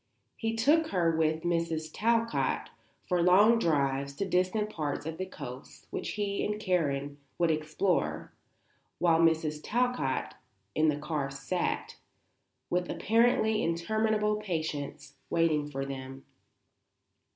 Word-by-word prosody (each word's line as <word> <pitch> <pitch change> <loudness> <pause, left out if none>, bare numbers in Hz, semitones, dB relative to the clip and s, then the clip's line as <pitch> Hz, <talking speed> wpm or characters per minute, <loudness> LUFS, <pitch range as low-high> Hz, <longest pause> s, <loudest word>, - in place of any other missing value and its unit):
He 225 0 -2
took 300 +8 +3
her 170 - +1
with 160 0 +1
Mrs. 165 -2 -1
Talcott 230 +1 0 0.4
for 180 -2 +2
long 205 +6 +6
drives 140 -5 0
to 195 - -2
distant 190 +4 +1
parts 150 -6 -3
of 160 +1 -5
the 185 - -3
coast 125 -7 -9
which - - -3
he 205 -1 -1
and 210 0 -2
Karen 145 -8 -1 0.2
would 170 -2 +3
explore, 155 - -1 0.6
while 165 -2 +3
Mrs. 160 -2 +2
Talcott 180 - 0 0.4
in 155 0 +3
the 150 - 0
car 150 -2 -2
sat, 140 +6 -3 0.7
with 180 0 -1
apparently 225 -1 +2
interminable 210 +5 +1
patience, 150 -7 -4
waiting 155 -3 +2
for 135 -1 -3
them. 135 0 -7
165 Hz, 120 wpm, -30 LUFS, 150-210 Hz, 0.7 s, long